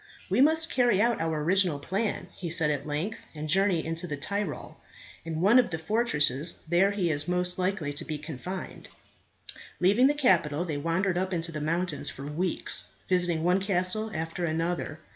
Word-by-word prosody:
"We - - +3
must 320 +3 +4
carry 245 -6 +3
out 235 -1 +2
our 160 -2 -1
original 180 -2 +2
plan," 195 +9 -3
he 175 - -6
said 160 -2 +2
at 145 0 -3
length, 155 +9 -3 0.2
"and 155 0 -5
journey 190 +1 +2
into 165 +2 -1
the 145 -3 -4
Tyrol. 200 -1 -4 0.5
In 160 -1 -4
one 210 +7 +6
of 245 - +2
the 160 - -3
fortresses 160 - +1
there 175 +4 +3
he 190 -5 0
is 145 0 0
most 180 0 -1
likely 180 -6 -1
to 145 - -4
be 155 -2 -4
confined." 155 +5 -7 0.9
Leaving 205 +8 +4
the 290 - +1
capital 175 - +2
they 155 -4 -3
wandered 175 +4 0
up 185 0 -2
into 165 0 -1
the 150 -2 -5
mountains 165 0 -1
for 135 - -8
weeks, 165 +5 -2 0.2
visiting 175 -3 +2
one 180 +2 +3
castle 195 +3 +2
after 165 0 -4
another. 165 -1 -2
175 Hz, 180 wpm, -28 LUFS, 155-195 Hz, 0.9 s, one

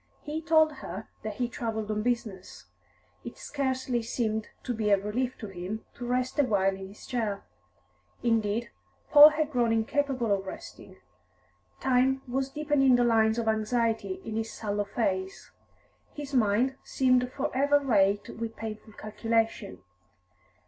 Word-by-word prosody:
He 305 +2 -4
told 315 -1 +4
her - - -7
that 215 -1 -5
he 245 +1 -1
travelled 220 -3 -3
on 210 0 -1
business. 220 -5 -3 0.6
It - - -8
scarcely 260 -3 -2
seemed 220 -2 -2 0.2
to 245 - -2
be 215 -2 -1
a 200 - +6
relief 230 +6 -2
to 220 - -7
him 190 +4 -6
to 245 - -7
rest 250 +3 -1
awhile 200 -8 +2
in 190 0 -8
his 200 +2 -13
chair; 220 -6 -2 0.8
indeed, 225 0 0 0.4
Paul 295 0 +11
had 305 0 -1
grown 240 -4 +2
incapable 240 0 +1
of 195 -1 -2
resting. - - -10 0.8
Time 265 +1 +2
was 265 +2 -1
deepening 285 -3 +3
the 245 - +3
lines 220 -1 +3
of 230 -1 -1
anxiety 225 - 0
on 220 0 -4
his 225 0 -3
sallow 205 -1 -2
face. 190 -3 -2 0.6
His 290 -1 -7
mind 245 +3 +2
seemed 255 -1 +2
for 265 -1 -3
ever 285 +2 +4
racked 205 -7 +2
with 225 0 -5
painful 215 0 -7
calculation. 225 - -2
230 Hz, 145 wpm, -28 LUFS, 215-260 Hz, 0.8 s, Paul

